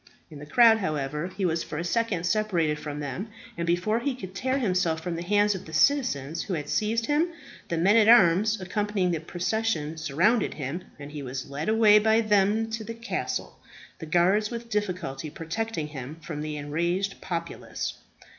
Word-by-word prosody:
In 150 - -9
the 145 - -10
crowd, 225 +5 +6
however, 150 -2 -2
he 190 +1 -3
was 165 -1 0
for 150 - -6
a 165 - -2
second 185 -2 0
separated 175 -7 +1
from 150 -1 -5
them; 145 - -4 0.3
and 170 0 -3
before 180 +6 +1
he 270 +1 -2
could 190 -7 -8
tear 260 +7 -1
himself 180 -9 +1
from 170 +1 -4
the 165 - -4
hands 205 +3 +3
of 190 - -7
the 160 - -11
citizens 160 - +2
who 190 - -3
had 145 -2 -5
seized 225 +2 0
him, 295 +5 +2 0.4
the 170 - -2
men 190 +6 +4
at 220 -2 +5
arms 210 0 +5
accompanying 195 -1 -1
the 165 - -1
procession 175 -1 -2
surrounded 165 - +1
him, 155 +6 -5
and 145 0 -9
he 150 -1 -6
was 130 +1 -6
led 145 +7 -3
away 215 -1 +6
by 220 +1 +3
them 210 0 +2
to 220 0 -3
the 230 +2 -6
castle, 230 +1 -4 0.4
the 160 - -7
guards 185 +6 +3
with 235 -1 -7
difficulty 180 -9 -2
protecting 165 +1 -4
him 140 +1 -7
from 150 -1 -6
the 150 0 -4
enraged 170 +7 -2
populace. 170 -2 -4
180 Hz, 185 wpm, -26 LUFS, 155-215 Hz, 0.4 s, crowd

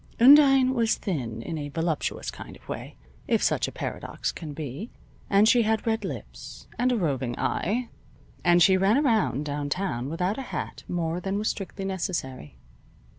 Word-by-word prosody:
Undine 270 0 +7
was 230 -3 +2
thin 120 - -4
in 160 +3 -4
a 145 -1 -5
voluptuous 165 0 -2
kind - - -10
of - - -20
way, - - -6 0.3
if - - +2
such - - +2
a - - -6
paradox - - -4
can 155 -3 -8
be, 145 - -6 0.4
and 200 +2 +5
she 240 +1 +5
had 220 -1 0
red 225 -1 0
lips, - - -8
and 250 +1 +3
a 245 - +1
roving 135 - -1
eye, 235 +7 -1 0.6
and 175 -1 +5
she 190 +2 +5
ran 195 +6 +3
around 225 - +1
downtown 145 -2 -2
without 180 - -1
a 265 - -7
hat - - -5
more 170 -1 -2
than 195 +2 -2
was 210 +1 0
strictly 195 0 -5
necessary. 135 - -4
185 Hz, 170 wpm, -26 LUFS, 150-220 Hz, 0.6 s, Undine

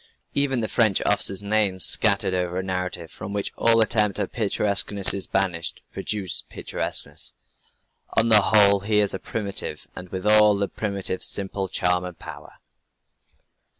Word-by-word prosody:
Even 135 -3 0
the 110 - -1
French 110 -5 +2
officers' 95 +1 +2
names 100 -3 +1
scattered 100 -3 +2
over 90 -1 -2
a 95 - -2
narrative 90 -3 -5
from 100 - -8
which 100 -1 -3
all 115 -1 +3
attempt 105 -2 +2
at 100 -2 -3
picturesqueness 100 -2 +3
is 100 - -3
banished, 90 -4 -2
produce 100 -5 -1
picturesqueness.... - - -3 0.8
On 115 +1 +4
the 105 -2 +7
whole 100 -1 +4
he 105 +2 -1
is 105 -1 +1
a 95 - -4
primitive, 100 -1 -4
and 90 0 -9
with 95 +1 -6
all 105 -1 +5
the 100 0 -1
primitive's 100 -3 -3
simple 100 -1 -3
charm 90 -1 0
and 90 -2 -8
power." - - -11
100 Hz, 150 wpm, -23 LUFS, 95-105 Hz, 0.8 s, the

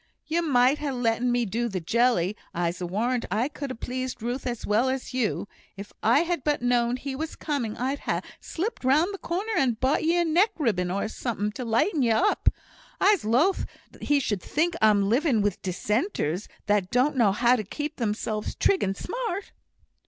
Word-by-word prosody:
"You 335 +2 0
might 270 -3 +3
ha' 295 - -2
letten 245 0 +1
me 240 -1 +1
do 235 +4 -1
the 190 -3 -3
jelly; 215 0 +2 0.2
I'se 170 +1 -1
warrant 230 +8 -1
I 215 +7 +1
could 290 -1 -6
ha' 230 - -8
pleased 255 -2 -4
Ruth 250 +3 -3
as 240 -2 -3
well 225 +5 +2
as 260 0 -3
you. 240 -5 -1 0.3
If 200 +1 -9
I 230 +6 +4
had 340 -4 -1
but 295 -4 0
known 245 0 +2
he 270 +1 -5
was 320 +3 -4
coming, 265 -8 -3
I'd 265 +4 -1
ha' - - -1 0.2
slipped 385 - -4
round 305 +9 +3
the 395 - -6
corner 390 +6 -3
and 245 -5 +1
bought 265 +5 +1
ye 335 +2 +2
a 345 - +3
neck 350 +7 +3
ribbon, 205 - 0
or 200 +3 -1
summut 210 -2 -3
to 250 - -5
lighten 255 - +1
ye 240 - +3
up. 360 - +3 0.5
I'se 400 -3 +4
loath 265 - +2 0.3
he 290 -1 +2
should 205 -8 -2
think 335 - 0
I'm 205 -2 +4
living 250 +2 +2
with 205 -3 -1
Dissenters, 195 - -1 0.2
that 205 -3 +1
don't 260 +6 +2
know 230 -6 +4
how 235 +5 +3
to 220 - -2
keep 295 +9 -5
themselves 215 -2 -2
trig 395 - +2
and 195 0 -1
smart." 450 -6 -4
245 Hz, 190 wpm, -26 LUFS, 215-300 Hz, 0.5 s, I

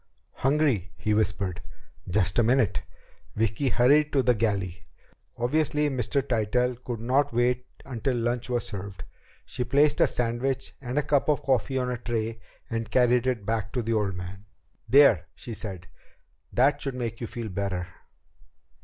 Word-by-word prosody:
"Hungry," 135 - +1
he 105 - 0
whispered. 100 -4 0 0.5
"Just 95 +2 +2
a - - +5
minute." 120 -2 +2 0.5
Vicki 110 +5 0
hurried 145 +6 +4
to 135 -2 +3
the 125 - +4
galley. 100 -6 -2 0.5
Obviously, 150 +3 +1
Mr. 130 +1 0
Tytell 125 +2 +1
could 120 -3 -4
not 130 +5 +1
wait 125 +1 +1 0.2
until 125 0 -2
lunch 120 +1 -1
was 120 -1 0
served. 95 -5 -6 0.4
She 125 - -3
placed 140 +4 +3
a - - +6
sandwich 125 +3 -2
and 125 +1 -4
a 150 - +3
cup 145 0 +1
of 150 - +1
coffee 130 0 +1
on 125 -1 0
a 125 - -2
tray 115 -1 -3 0.3
and 115 -2 -3
carried 125 0 +3
it 120 -6 -1
back 110 -2 -1
to 125 - -1
the 115 +1 -1
old 105 -4 0
man. 90 +3 -8 0.4
"There," 140 +3 +6
she 120 - -8
said. 100 -5 -6 0.7
"That 135 +4 +3
should 135 -2 -3
make 115 -2 -4
you 115 - -3
feel 115 -2 -5
better." 95 -2 -2
120 Hz, 160 wpm, -27 LUFS, 105-130 Hz, 0.7 s, a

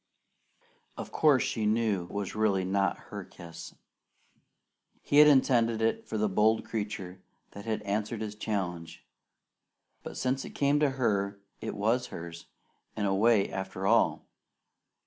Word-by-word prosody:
Of - - -7
course, 145 -5 +4
she 110 -2 -1
knew 105 -5 +1
it 100 -2 -4
really 105 -3 +1
was 95 - -4
not 100 -2 +1
her - - -5
kiss. 85 -1 -11 1.3
He 145 - +1
had 150 - +9
intended 120 -5 +4
it 115 0 0
for 110 - -3
the 105 0 +1
bold 110 +3 +2
creature 100 -4 -5 0.3
that 100 - -10
had 110 -2 -2
answered 105 +2 -2
his 105 -1 -4
challenge, 95 -6 -4 1.0
but - - -8
since 130 +1 -1
it - - -10
came 145 +1 +2
to 150 -2 +3
her, 100 -5 0 0.2
it - - -5
was 115 +5 +1
hers, 85 0 -9 0.5
in 105 - 0
a 95 - +1
way, 105 0 +3
after 95 0 -5
all. - - +3
105 Hz, 145 wpm, -29 LUFS, 95-115 Hz, 1.3 s, had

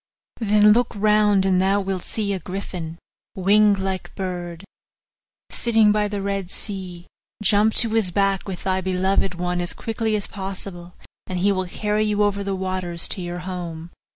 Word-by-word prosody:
Then 210 -1 +5
look 240 +1 +1
round 210 -1 +3
and 185 -1 +3
thou 195 +2 +3
wilt 190 -2 -2
see 205 -3 -2
a 190 - -2
griffin, 175 -2 -6 0.4
winged 205 +2 +4
like 190 -1 -4
bird, 180 -2 -5 0.9
sitting 225 -3 +3
by 210 0 +2
the 205 -1 -4
Red 195 -2 -2
Sea; 185 -4 -6 0.4
jump 210 +2 +4
on - - +5
to 230 - +1
his 220 -4 +2
back 195 +2 +1
with 185 -2 -6
thy 190 0 0
beloved 190 0 0
one 180 0 -1
as 175 - +1
quickly 225 -1 -2
as 205 - -1
possible, 190 -2 -7 0.3
and 185 - -3
he 195 +3 +3
will 185 -1 0
carry 210 +3 0
you 210 -1 +1
over 200 -1 0
the 195 -1 -2
waters 185 -2 -1
to 190 - -2
your 175 0 -5
home. 170 -3 -6
195 Hz, 175 wpm, -22 LUFS, 180-210 Hz, 0.9 s, Then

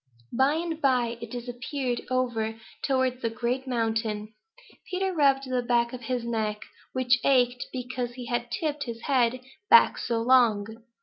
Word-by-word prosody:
By 270 +4 +3
and 325 -1 -3
by 245 -4 +1
it 230 - -6
disappeared 245 +1 -4
over 230 -3 -1 0.2
towards 260 -2 0
the 230 - 0
Great 245 +4 -2
Mountain. 225 -3 -1 0.6
Peter 380 +1 -1
rubbed 275 -4 +3
the 255 -1 0
back 235 0 +1
of 250 - -6
his 245 0 -2
neck, 215 -2 -2 0.3
which 255 0 +2
ached 250 -2 +3
because 250 -1 -4
he 250 0 -8
had 240 0 -2
tipped 295 +1 -2
his 230 -2 -6
head 255 -2 +1 0.3
back 465 - +7
so 235 -2 -1
long. 235 -5 +4
245 Hz, 150 wpm, -27 LUFS, 235-260 Hz, 0.6 s, back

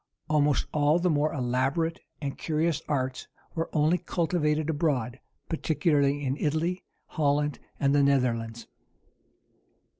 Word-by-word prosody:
Almost 150 -1 +2
all 150 +1 +3
the 175 0 +1
more 150 +1 +2
elaborate 135 +6 0 0.2
and 140 -2 -3
curious 160 0 0
arts 130 -3 -2 0.3
were 165 0 -2
only 155 +3 +2
cultivated 155 -3 0
abroad, 140 -6 0 0.3
particularly 145 -3 +1
in 135 +2 -1
Italy, 165 +5 -1 0.2
Holland, 145 -2 0 0.2
and 140 0 +2
the 145 - +4
Netherlands. 120 -5 +1
150 Hz, 115 wpm, -28 LUFS, 140-160 Hz, 0.3 s, the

